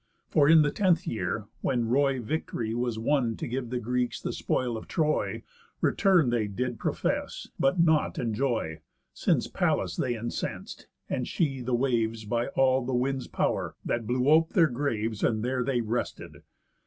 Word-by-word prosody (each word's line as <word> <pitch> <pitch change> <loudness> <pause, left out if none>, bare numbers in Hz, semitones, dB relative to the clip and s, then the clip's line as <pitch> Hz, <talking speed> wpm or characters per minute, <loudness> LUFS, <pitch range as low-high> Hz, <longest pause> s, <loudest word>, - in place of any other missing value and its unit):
For 145 -2 +4
in 160 -1 +8
the 145 - +1
tenth 185 -2 +2
year, 110 - -2 0.2
when 120 -4 0
roy 135 +2 +2
victory 115 -3 -3
Was 120 -1 -1
won 120 -1 +1
to - - -4
give 125 0 -3
the 125 0 -2
Greeks 125 +1 -1
the - - -4
spoil 125 -2 -1
of 110 - -7
Troy, 155 -2 0 0.4
Return 180 - +3
they 115 -3 +1
did 120 +3 -3
profess, - - -2
but 135 +6 +2
not 160 -2 +3
enjoy, 110 - -1 0.3
Since - - +1
Pallas - - 0
they 120 -2 0
incens'd, 120 +1 -5 0.2
and 125 - -2
she 135 -6 -1
the 125 0 0
waves 115 -3 0
By 115 +3 -1
all 130 -1 +3
the 125 +1 -2
winds' 130 +1 -1
pow'r, - - -1
that 115 -2 -1
blew 125 +2 +1
ope 160 +2 +4
their 165 -5 +5
graves. 115 -5 -2
And 110 0 +1
there 125 0 0
they 125 -1 0
rested. 115 +2 -4
125 Hz, 165 wpm, -28 LUFS, 115-140 Hz, 0.4 s, in